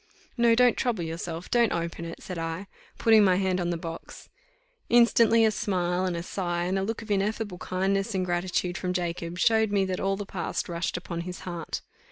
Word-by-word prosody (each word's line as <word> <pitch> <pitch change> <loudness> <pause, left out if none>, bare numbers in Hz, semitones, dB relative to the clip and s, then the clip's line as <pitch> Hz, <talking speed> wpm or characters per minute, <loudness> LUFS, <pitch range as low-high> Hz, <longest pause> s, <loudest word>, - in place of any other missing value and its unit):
"No, 235 -2 +4
don't 245 0 +5
trouble 235 -8 0
yourself 165 +1 -5
don't 235 -2 +4
open 170 0 -3
it," 165 - -8
said 185 -4 -5
I, 165 +3 -3 0.3
putting 220 -2 +6
my 185 -2 +4
hand 185 -1 +1
on 175 - -1
the 170 - -1
box. 165 0 -8 0.6
Instantly 230 -1 +5
a 220 - +4
smile, 180 -3 0
and 180 -2 -1
a 170 - -4
sigh, 175 -2 -2
and 185 +2 0
a - - -1
look 225 +3 -3
of 215 - -7
ineffable 205 -1 -1
kindness 195 +3 -1
and 185 -1 0
gratitude 175 0 -1
from 180 -1 -2
Jacob, 175 -1 -3
showed 220 +1 +3
me 200 -1 +2
that 185 -1 -2
all 195 0 +1
the 205 - -5
past 190 -2 -3
rushed 170 +1 -2
upon 170 -1 -5
his 180 +1 -7
heart. 175 -3 -5
185 Hz, 205 wpm, -27 LUFS, 175-210 Hz, 0.6 s, putting